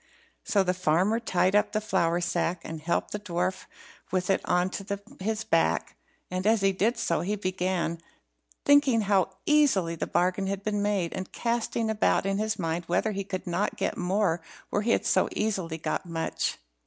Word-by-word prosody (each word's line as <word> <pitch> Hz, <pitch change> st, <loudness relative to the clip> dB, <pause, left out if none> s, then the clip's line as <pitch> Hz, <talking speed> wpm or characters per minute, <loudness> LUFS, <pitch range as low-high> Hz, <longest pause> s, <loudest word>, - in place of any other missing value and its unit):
So 200 Hz, -2 st, +2 dB
the 180 Hz, -1 st, +1 dB
farmer 185 Hz, +5 st, +2 dB
tied 190 Hz, -4 st, +1 dB
up 210 Hz, -, +3 dB
the 215 Hz, -, +2 dB
flour 175 Hz, -5 st, +1 dB
sack, 175 Hz, 0 st, -1 dB
and 160 Hz, -1 st, -6 dB
helped 170 Hz, +2 st, -1 dB
the 210 Hz, -, -3 dB
dwarf 185 Hz, -1 st, -2 dB, 0.5 s
with 185 Hz, +1 st, +1 dB
it 195 Hz, -, +2 dB
on 180 Hz, +1 st, +1 dB
to 200 Hz, 0 st, -4 dB, 0.2 s
his 215 Hz, +3 st, -2 dB
back, 80 Hz, -, +1 dB, 0.4 s
and 185 Hz, +2 st, -1 dB
as 220 Hz, -1 st, +4 dB
he 195 Hz, 0 st, +4 dB
did 215 Hz, +6 st, +1 dB
so 200 Hz, -7 st, 0 dB
he 205 Hz, +4 st, -1 dB
began 185 Hz, -3 st, -1 dB, 0.7 s
thinking 285 Hz, -5 st, +5 dB
how 195 Hz, -2 st, +1 dB
easily 270 Hz, -, +3 dB
the 165 Hz, -, -3 dB
bargain 185 Hz, +2 st, +1 dB
had 195 Hz, 0 st, -3 dB
been 205 Hz, -1 st, -1 dB
made, 200 Hz, -5 st, 0 dB
and 185 Hz, -, -5 dB
casting 235 Hz, -1 st, -1 dB
about 215 Hz, -3 st, +2 dB
in 195 Hz, 0 st, 0 dB
his 215 Hz, 0 st, -1 dB
mind 165 Hz, -1 st, -2 dB
whether, 195 Hz, +6 st, +1 dB
he 200 Hz, -1 st, -3 dB
could 190 Hz, -1 st, -5 dB
not 180 Hz, +3 st, -1 dB
get -, -, -1 dB
more 180 Hz, -2 st, +1 dB, 0.3 s
where 205 Hz, -, +1 dB
he 225 Hz, -, -1 dB
had -, -, +2 dB
so -, -, +3 dB
easily 190 Hz, -7 st, -1 dB
got 160 Hz, -, -2 dB
much. 165 Hz, -1 st, -2 dB
190 Hz, 185 wpm, -27 LUFS, 175-210 Hz, 0.7 s, thinking